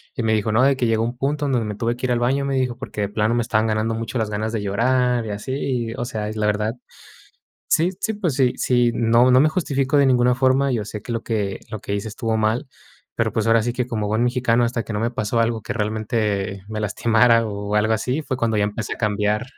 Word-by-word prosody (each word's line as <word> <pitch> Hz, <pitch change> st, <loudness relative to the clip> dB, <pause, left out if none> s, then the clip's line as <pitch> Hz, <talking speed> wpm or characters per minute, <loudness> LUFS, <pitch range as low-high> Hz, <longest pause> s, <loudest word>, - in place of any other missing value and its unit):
Y 120 Hz, -, -2 dB
me 110 Hz, 0 st, +2 dB
dijo: 110 Hz, 0 st, 0 dB
"No, 110 Hz, +4 st, +3 dB
de 135 Hz, 0 st, +4 dB
que 130 Hz, -, -1 dB
llegó 115 Hz, 0 st, +1 dB
un 120 Hz, +1 st, -3 dB
punto 145 Hz, +2 st, -1 dB
donde 125 Hz, -5 st, 0 dB
me 105 Hz, -, -4 dB
tuve 115 Hz, +3 st, -1 dB
que 125 Hz, -, -4 dB
ir 125 Hz, -, -1 dB
al 120 Hz, -, +2 dB
baño", 135 Hz, +3 st, +1 dB
me 135 Hz, -1 st, -1 dB
dijo: 125 Hz, -2 st, 0 dB
"Porque 125 Hz, -5 st, -6 dB
de 100 Hz, -, -1 dB
plano 110 Hz, +2 st, 0 dB
me 120 Hz, -, +2 dB
estaban 110 Hz, -1 st, +1 dB
ganando 110 Hz, +1 st, 0 dB
mucho 115 Hz, +2 st, -4 dB
las 110 Hz, -2 st, -1 dB
ganas 110 Hz, +1 st, -2 dB
de 110 Hz, -, -1 dB
llorar 125 Hz, +3 st, +1 dB
y 110 Hz, -, -5 dB
así". 105 Hz, +6 st, -5 dB
Y, 125 Hz, -4 st, -2 dB
o 120 Hz, -, -3 dB
sea, 110 Hz, -4 st, -4 dB
es 110 Hz, -, -6 dB
la 105 Hz, -1 st, -1 dB
verdad, 105 Hz, +2 st, 0 dB, 1.0 s
sí 170 Hz, +3 st, +3 dB
sí, 220 Hz, -, -1 dB
pues 180 Hz, -9 st, -1 dB
sí 125 Hz, -2 st, +2 dB
sí, 120 Hz, -1 st, +2 dB
no, 115 Hz, +2 st, +4 dB
no 130 Hz, +1 st, +6 dB
me 155 Hz, -, +5 dB
justificó 145 Hz, -5 st, 0 dB
de 140 Hz, -, +5 dB
ninguna 125 Hz, -1 st, +3 dB
forma, 135 Hz, +1 st, +2 dB
yo 110 Hz, -4 st, -1 dB
sé 105 Hz, 0 st, -7 dB
que 120 Hz, -, -5 dB
lo 115 Hz, -, -2 dB
que 105 Hz, -4 st, -2 dB
lo 110 Hz, -, -4 dB
que 100 Hz, -, -4 dB
hice 100 Hz, +2 st, -3 dB
estuvo 110 Hz, +1 st, -2 dB
mal, 110 Hz, +5 st, 0 dB, 0.5 s
pero, -, -, 0 dB
pues, 110 Hz, 0 st, 0 dB
ahora 115 Hz, -1 st, +4 dB
sí 120 Hz, -, -1 dB
que 125 Hz, 0 st, -2 dB
como 110 Hz, -4 st, -2 dB
buen 110 Hz, +2 st, 0 dB
mexicano 120 Hz, -1 st, +2 dB
hasta 115 Hz, -1 st, -2 dB
que 115 Hz, -, -6 dB
no 105 Hz, -, -2 dB
me 115 Hz, +1 st, 0 dB
pasó 115 Hz, -2 st, -1 dB
algo 115 Hz, -1 st, 0 dB
que -, -, -5 dB
realmente, 105 Hz, -2 st, -2 dB
me 110 Hz, -, -4 dB
lastimara, 115 Hz, +2 st, +3 dB
o, 105 Hz, 0 st, -4 dB
algo 110 Hz, +1 st, +2 dB
así, 125 Hz, +7 st, -1 dB
fue 130 Hz, -3 st, -3 dB
cuando 115 Hz, -3 st, 0 dB
ya 105 Hz, -, +2 dB
empecé 105 Hz, +1 st, -4 dB
a -, -, -13 dB
cambiar. 105 Hz, 0 st, 0 dB
115 Hz, 265 wpm, -22 LUFS, 110-125 Hz, 1.0 s, no